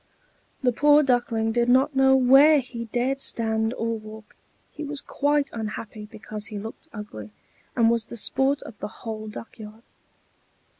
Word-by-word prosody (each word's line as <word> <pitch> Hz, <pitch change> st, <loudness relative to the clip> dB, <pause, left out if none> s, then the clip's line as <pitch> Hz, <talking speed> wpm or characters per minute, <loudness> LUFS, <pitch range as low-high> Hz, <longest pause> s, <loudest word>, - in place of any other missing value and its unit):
The 250 Hz, -, +3 dB
poor 295 Hz, +4 st, +5 dB
Duckling 240 Hz, -4 st, +1 dB
did 240 Hz, +1 st, +1 dB
not 270 Hz, +3 st, +3 dB
know 265 Hz, 0 st, +5 dB
where 270 Hz, +4 st, +6 dB
he 245 Hz, -2 st, -6 dB
dared 250 Hz, +4 st, -1 dB
stand 220 Hz, -2 st, +1 dB
or 230 Hz, 0 st, -2 dB
walk; 215 Hz, 0 st, -12 dB, 0.4 s
he -, -, -7 dB
was 290 Hz, -1 st, -4 dB
quite 290 Hz, 0 st, 0 dB
unhappy 215 Hz, -1 st, -6 dB
because 215 Hz, 0 st, -7 dB
he 210 Hz, -, -7 dB
looked 220 Hz, +3 st, -9 dB
ugly, 205 Hz, -, -8 dB, 0.5 s
and 230 Hz, -2 st, +4 dB
was 230 Hz, -1 st, +1 dB
the 235 Hz, -, -8 dB
sport 270 Hz, +5 st, +1 dB
of 225 Hz, -, -11 dB
the 205 Hz, -, -4 dB, 0.2 s
whole 215 Hz, -1 st, -5 dB
duck 220 Hz, +2 st, -10 dB
yard. 215 Hz, +1 st, -11 dB
235 Hz, 160 wpm, -24 LUFS, 220-265 Hz, 0.5 s, where